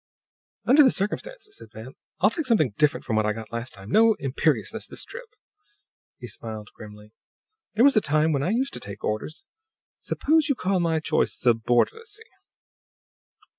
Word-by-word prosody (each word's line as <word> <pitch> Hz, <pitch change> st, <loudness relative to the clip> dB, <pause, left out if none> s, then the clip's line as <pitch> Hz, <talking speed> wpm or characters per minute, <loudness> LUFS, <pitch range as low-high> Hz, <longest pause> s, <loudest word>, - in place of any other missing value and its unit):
"Under 285 Hz, +4 st, +6 dB
the 270 Hz, -, +7 dB
circumstances," 415 Hz, -, -4 dB
said -, -, -13 dB
Van, 115 Hz, +5 st, -10 dB, 0.3 s
"I'll 205 Hz, +5 st, +4 dB
take 310 Hz, +2 st, -2 dB
something 155 Hz, -, +2 dB
different 150 Hz, +3 st, +1 dB
from 110 Hz, -, -1 dB
what 110 Hz, -, +2 dB
I 105 Hz, -, +1 dB
got 110 Hz, 0 st, -9 dB
last 115 Hz, +2 st, -5 dB
time. 100 Hz, +2 st, -11 dB
No 225 Hz, 0 st, +5 dB
imperiousness 140 Hz, +3 st, -1 dB
this -, -, -7 dB
trip." 485 Hz, -1 st, -11 dB, 0.8 s
He 125 Hz, -, -9 dB
smiled 110 Hz, -1 st, -7 dB
grimly. 105 Hz, -1 st, -13 dB, 0.6 s
"There 230 Hz, +4 st, +5 dB
was 280 Hz, -, +5 dB
a 215 Hz, -, +5 dB
time 155 Hz, +1 st, +2 dB
when 140 Hz, -3 st, 0 dB
I 165 Hz, -, 0 dB
used 260 Hz, +6 st, 0 dB
to -, -, -5 dB
take 100 Hz, 0 st, -9 dB
orders. 130 Hz, -, -4 dB, 0.5 s
Suppose 315 Hz, +1 st, +1 dB
you 280 Hz, -, +2 dB
call 190 Hz, -4 st, 0 dB
my 165 Hz, -2 st, +1 dB
choice -, -, 0 dB
'subordinacy.'" 125 Hz, -, +1 dB
155 Hz, 170 wpm, -25 LUFS, -, 0.8 s, the